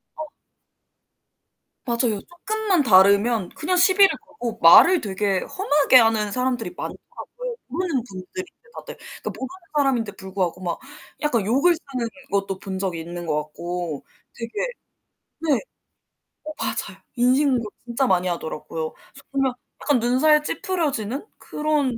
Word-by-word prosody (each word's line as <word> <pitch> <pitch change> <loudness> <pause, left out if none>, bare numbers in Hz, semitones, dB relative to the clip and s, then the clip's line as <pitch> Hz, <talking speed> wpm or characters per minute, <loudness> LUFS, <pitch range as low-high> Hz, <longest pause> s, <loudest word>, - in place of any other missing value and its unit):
어. 310 - -6 1.6
맞아요. 235 -3 +1
쪼끔만 390 -1 -1
다르면 200 0 +4
그냥 365 +4 -1
시비를 385 +2 +7
걸고 245 -6 -7
말을 335 - +8
되게 195 -1 0
험하게 295 -8 +3
하는 225 -3 +3
사람들이 250 - -1
많더라고요, - - -7
모르는 300 -3 -2
분들인데 195 - -8 0.3
다들. - - -8
그러니까 - - -8
모르는 260 - -6 0.3
사람인데 255 -7 +1
불구하고 190 -2 -3
막 175 -2 -3 0.4
약간 240 -9 +1
욕을 275 - +3
쓰는 260 -7 -5 0.2
것도 195 -1 -1
본 190 -1 -5
적이 180 -4 -2
있는 175 +1 -7
것 150 -2 0
같고 170 0 -5 0.3
되게 230 -1 -6 0.9
네. 310 -3 +1 0.8
어 310 - -6
맞아요. - - -3
인신공격 250 -2 +2
진짜 240 +3 0
많이 185 -5 +2
하더라고요. 160 -2 -4 0.4
정말 270 -2 +1 0.3
약간 280 -3 +2
눈살 295 +6 +3
찌푸려지는 290 - -2
그런 295 -5 -1
240 Hz, 300 characters per minute, -23 LUFS, 195-300 Hz, 1.6 s, 말을